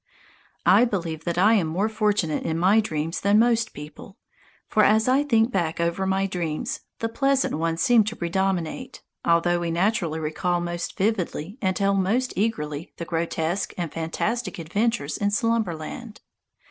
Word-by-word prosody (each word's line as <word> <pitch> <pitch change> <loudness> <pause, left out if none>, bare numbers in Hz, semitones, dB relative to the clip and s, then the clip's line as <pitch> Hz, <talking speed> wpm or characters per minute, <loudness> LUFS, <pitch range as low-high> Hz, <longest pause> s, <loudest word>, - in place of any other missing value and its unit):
I 190 +6 +6
believe 170 -9 -2
that 170 -1 -2
I 205 +5 +5
am 195 -7 +2
more 185 +7 0
fortunate 210 -7 0
in 160 0 -2
my 190 +6 +4
dreams 165 -5 -2
than 200 +1 +4
most 230 0 +3
people; 150 +7 -11 0.5
for 215 - +3
as 220 +2 +4
I 260 +2 +4
think 235 -5 +2
back 170 -6 -1
over 170 +3 0
my 190 0 +1
dreams, 185 - -3 0.2
the 225 - -2
pleasant 275 +4 +1
ones 165 +1 -1
seem 240 -3 +5
to 220 +2 -3
predominate, 190 +7 -2 0.2
although 170 +1 +2
we 170 -1 -2
naturally 175 -2 0
recall 175 +3 -1
most 175 0 -4
vividly 195 - -2
and 190 -1 +1
tell 200 +1 +2
most 210 +7 +1
eagerly 165 -8 -2
the 170 - -5
grotesque 165 +2 -2
and 170 -4 -4
fantastic 185 +6 -2
adventures 180 -1 -1
in 205 - +1
Slumberland. 215 -1 -2
190 Hz, 160 wpm, -24 LUFS, 165-220 Hz, 0.5 s, I